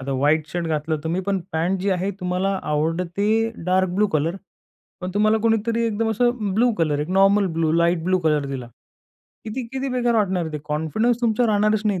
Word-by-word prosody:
आता 135 Hz, +1 st, -4 dB
white 150 Hz, +4 st, +2 dB
shirt 170 Hz, +2 st, -3 dB
घातलं 155 Hz, 0 st, -1 dB
तुम्ही 170 Hz, +3 st, -1 dB
पण 200 Hz, -1 st, +1 dB
पॅन्ट 175 Hz, +4 st, 0 dB
जी 200 Hz, +2 st, 0 dB
आहे 185 Hz, +1 st, 0 dB
तुम्हाला 185 Hz, +2 st, -1 dB
आवडते 165 Hz, +6 st, -1 dB, 0.4 s
डार्क 185 Hz, +1 st, +2 dB
ब्लू 210 Hz, +2 st, +3 dB
कलर, 165 Hz, +1 st, 0 dB, 0.6 s
पण 180 Hz, 0 st, -4 dB
तुम्हाला 215 Hz, +1 st, +3 dB
कोणीतरी 230 Hz, +1 st, +1 dB
एकदम 225 Hz, 0 st, -1 dB
असं 225 Hz, -2 st, 0 dB
ब्लू 240 Hz, +3 st, +3 dB
कलर, 155 Hz, -3 st, +1 dB
एक 150 Hz, -, -3 dB
normal 195 Hz, +1 st, +4 dB
blue, 160 Hz, -1 st, +1 dB
light 170 Hz, 0 st, +2 dB
blue 185 Hz, +1 st, +2 dB
colour 155 Hz, -4 st, +1 dB
दिला. 135 Hz, -3 st, -5 dB, 0.8 s
किती 225 Hz, +4 st, -4 dB
किती 265 Hz, +1 st, -2 dB
बेकार 245 Hz, -2 st, 0 dB
वाटणार 190 Hz, -5 st, +1 dB
आहे 160 Hz, -, -6 dB
ते. 150 Hz, -, -3 dB
कॉन्फिडन्स 160 Hz, -, 0 dB
तुमचा 235 Hz, +1 st, +2 dB
राहणारच 215 Hz, 0 st, +2 dB
नाही, 200 Hz, -3 st, 0 dB
185 Hz, 190 wpm, -22 LUFS, 160-215 Hz, 0.8 s, normal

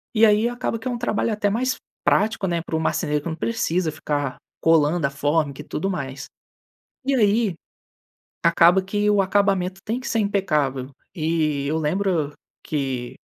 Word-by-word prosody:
E 220 Hz, +1 st, +6 dB
aí, 215 Hz, +1 st, +4 dB
acaba 240 Hz, -2 st, -3 dB
que 225 Hz, -, -6 dB
é -, -, 0 dB
um 240 Hz, -, -2 dB
trabalho 230 Hz, -1 st, 0 dB
até 205 Hz, -1 st, +1 dB
mais 255 Hz, +5 st, 0 dB, 0.3 s
prático, 210 Hz, -2 st, +2 dB
né, 170 Hz, -1 st, 0 dB
para -, -, -3 dB
o -, -, +1 dB
marceneiro, 150 Hz, -2 st, 0 dB
que -, -, -3 dB
não 160 Hz, -, -3 dB
precisa 180 Hz, -4 st, 0 dB
ficar 145 Hz, -3 st, -3 dB, 0.2 s
colando 165 Hz, 0 st, +3 dB
a 140 Hz, -, +2 dB
fórmica 145 Hz, 0 st, 0 dB
e -, -, -10 dB
tudo 190 Hz, +5 st, -3 dB
mais. 135 Hz, -6 st, -4 dB, 0.8 s
E 275 Hz, 0 st, +2 dB
aí, 210 Hz, -4 st, +2 dB, 0.9 s
acaba 170 Hz, +2 st, +5 dB
que 205 Hz, +2 st, 0 dB
o 200 Hz, -1 st, +4 dB
acabamento 195 Hz, -1 st, +1 dB
tem 230 Hz, +3 st, -1 dB
que 270 Hz, -, -5 dB
ser 230 Hz, -, 0 dB
impecável. 150 Hz, -10 st, 0 dB, 0.2 s
E 155 Hz, -4 st, 0 dB
eu 155 Hz, +3 st, 0 dB
lembro 160 Hz, -1 st, 0 dB, 0.3 s
que, 135 Hz, -5 st, -3 dB
175 Hz, 170 wpm, -23 LUFS, 150-210 Hz, 0.9 s, E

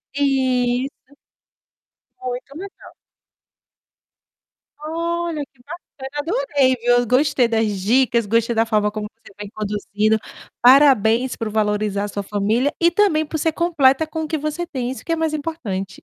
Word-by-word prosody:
Isso. 260 Hz, -1 st, 0 dB, 1.1 s
Muito 255 Hz, +2 st, -6 dB
legal. 390 Hz, +2 st, -11 dB, 1.9 s
Olha 335 Hz, 0 st, -3 dB
que 265 Hz, -2 st, -28 dB
bacana, 290 Hz, -4 st, -10 dB
adorei 290 Hz, -, +1 dB
viu, 245 Hz, 0 st, +3 dB
gostei 255 Hz, 0 st, +3 dB
das 225 Hz, -1 st, +1 dB, 0.2 s
dicas, 235 Hz, +2 st, +2 dB
gostei 230 Hz, +2 st, +1 dB
da 225 Hz, +1 st, +3 dB
forma 210 Hz, -2 st, +1 dB
como 215 Hz, -1 st, -5 dB
você 225 Hz, -, -18 dB
foi 205 Hz, -1 st, -7 dB
conduzindo, 210 Hz, +1 st, 0 dB, 0.4 s
parabéns 250 Hz, -2 st, +5 dB
por 225 Hz, -2 st, -4 dB
valorizar 210 Hz, -1 st, 0 dB
a -, -, -4 dB
sua 200 Hz, 0 st, -5 dB
família 215 Hz, -, 0 dB
e 340 Hz, 0 st, +5 dB
também 320 Hz, -6 st, +2 dB
ser 320 Hz, +1 st, +1 dB
completa 315 Hz, -4 st, +2 dB
com 320 Hz, +1 st, -4 dB
o 310 Hz, -, -4 dB
que 315 Hz, -, -1 dB
você 305 Hz, +4 st, -3 dB
tem 250 Hz, -5 st, -4 dB
isso 265 Hz, -, -9 dB
que -, -, -3 dB
é -, -, +3 dB
mais 320 Hz, -1 st, -1 dB
importante. 260 Hz, -, -4 dB
260 Hz, 140 wpm, -20 LUFS, 220-310 Hz, 1.9 s, parabéns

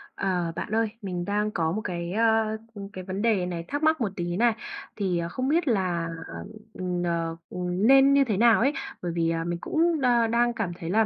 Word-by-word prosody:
Ờ, 180 Hz, -3 st, -1 dB
bạn -, -, -5 dB
ơi, 225 Hz, 0 st, +2 dB
mình 180 Hz, -3 st, -4 dB
đang 210 Hz, +2 st, 0 dB
có 160 Hz, -5 st, 0 dB
một 215 Hz, +5 st, -2 dB
cái, 175 Hz, -3 st, -4 dB
ờ, 220 Hz, 0 st, +2 dB, 0.4 s
cái 185 Hz, -, -6 dB
vấn 190 Hz, +2 st, -4 dB
đề 215 Hz, -5 st, +2 dB
này 170 Hz, -2 st, -4 dB
thắc 290 Hz, +2 st, -3 dB
mắc 315 Hz, -2 st, +3 dB
một 220 Hz, -, +1 dB
tí 175 Hz, 0 st, -3 dB
này. 235 Hz, +1 st, +4 dB, 0.4 s
Thì 185 Hz, -5 st, 0 dB
không 255 Hz, +8 st, -2 dB
biết 315 Hz, +2 st, +2 dB
là, 180 Hz, -7 st, 0 dB, 0.6 s
ừm, 180 Hz, -1 st, -3 dB
ờ, 165 Hz, -1 st, -1 dB
ừm, 180 Hz, +4 st, -1 dB
nên 270 Hz, +1 st, +7 dB
như 280 Hz, 0 st, +5 dB
thế 220 Hz, -7 st, -1 dB
nào 230 Hz, +1 st, +5 dB
ấy, 275 Hz, +5 st, +2 dB, 0.3 s
bởi 175 Hz, -1 st, -2 dB
vì, 165 Hz, -1 st, +1 dB
à, 165 Hz, 0 st, -1 dB
mình 175 Hz, 0 st, -3 dB
cũng 325 Hz, -1 st, +1 dB
đa 240 Hz, -3 st, +3 dB
đang 240 Hz, +1 st, +2 dB
cảm 220 Hz, -6 st, -2 dB
thấy 165 Hz, -, -5 dB
là 220 Hz, +4 st, +3 dB
200 Hz, 215 wpm, -26 LUFS, 175-235 Hz, 0.6 s, nên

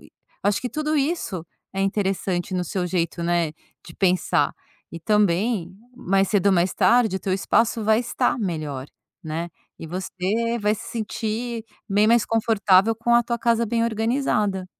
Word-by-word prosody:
eu -, -, -17 dB, 0.3 s
acho 205 Hz, 0 st, +2 dB
que 250 Hz, -, -4 dB
tudo 305 Hz, 0 st, -1 dB
isso 275 Hz, -, -1 dB, 0.3 s
é 195 Hz, 0 st, -1 dB
interessante 190 Hz, -3 st, -1 dB
no 180 Hz, -1 st, 0 dB
seu 180 Hz, +1 st, -2 dB
jeito, 170 Hz, -1 st, -2 dB
né, 170 Hz, -2 st, +1 dB, 0.4 s
de 165 Hz, -, -11 dB
pensar. 185 Hz, -2 st, +2 dB, 0.4 s
E 170 Hz, -, -7 dB
também, 200 Hz, 0 st, +1 dB, 0.3 s
mais 195 Hz, -1 st, +1 dB
cedo 205 Hz, -2 st, +1 dB
ou 200 Hz, -, +5 dB
mais 175 Hz, 0 st, +2 dB
tarde 230 Hz, -5 st, +3 dB
o -, -, -6 dB
teu 185 Hz, 0 st, -2 dB
espaço 225 Hz, +2 st, +1 dB
vai 220 Hz, +1 st, +4 dB
estar 240 Hz, 0 st, 0 dB
melhor, 155 Hz, -, -3 dB, 0.4 s
né, 165 Hz, +2 st, -4 dB, 0.3 s
e 165 Hz, -, -8 dB
você 190 Hz, +6 st, -2 dB
vai 210 Hz, 0 st, +1 dB
se 220 Hz, -, -9 dB
sentir 225 Hz, +1 st, -3 dB, 0.3 s
bem 205 Hz, +2 st, +3 dB
mais 235 Hz, 0 st, +4 dB
confortável 220 Hz, -2 st, +3 dB
com 235 Hz, +1 st, +1 dB
a 240 Hz, -, +5 dB
tua 235 Hz, 0 st, -2 dB
casa 235 Hz, 0 st, +2 dB
bem 230 Hz, +1 st, +1 dB
organizada. 220 Hz, -4 st, 0 dB
205 Hz, 165 wpm, -23 LUFS, 180-230 Hz, 0.4 s, ou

